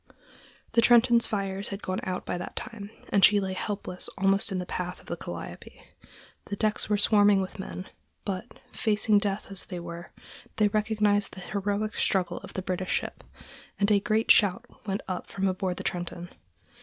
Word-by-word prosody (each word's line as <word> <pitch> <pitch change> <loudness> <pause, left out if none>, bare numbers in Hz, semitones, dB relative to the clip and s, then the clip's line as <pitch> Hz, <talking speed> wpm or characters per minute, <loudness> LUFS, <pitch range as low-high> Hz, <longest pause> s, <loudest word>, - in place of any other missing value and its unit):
The 230 - +4
Trenton's 235 0 +6
fires 195 -1 -2
had 200 0 -6
gone 185 0 -2
out 185 -1 -3
by - - -2
that - - -6
time, 210 -4 -6 0.2
and 200 - +3
she 205 +3 +8
lay 190 -1 -2
helpless 185 -2 -3
almost 195 +1 +2
in 190 - -1
the 180 - -2
path 180 0 -4
of - - -18
the - - -3
Calliope. - - -8 0.7
The 205 - -4
decks 215 +1 0
were 210 - +3
swarming 205 -1 +5
with 190 +1 -4
men, 190 -1 -6 0.4
but, 195 +3 -3 0.3
facing 215 -1 +3
death 200 -1 -2
as 195 - -2
they 180 -3 -5
were, 170 0 -8 0.4
they 210 -1 +3
recognized 210 -1 +1
the - - -8
heroic 205 +3 -2
struggle 185 -2 +1
of - - -11
the 185 - -2
British 185 0 -2
ship, - - -2 0.6
and 200 +1 +3
a 205 - +6
great 215 +2 +2
shout 195 -3 +4 0.2
went 195 +1 -1
up 185 -2 -4
from 195 0 -1
aboard 185 -1 -1
the - - -5
Trenton. 175 0 -3
200 Hz, 180 wpm, -28 LUFS, 185-210 Hz, 0.7 s, she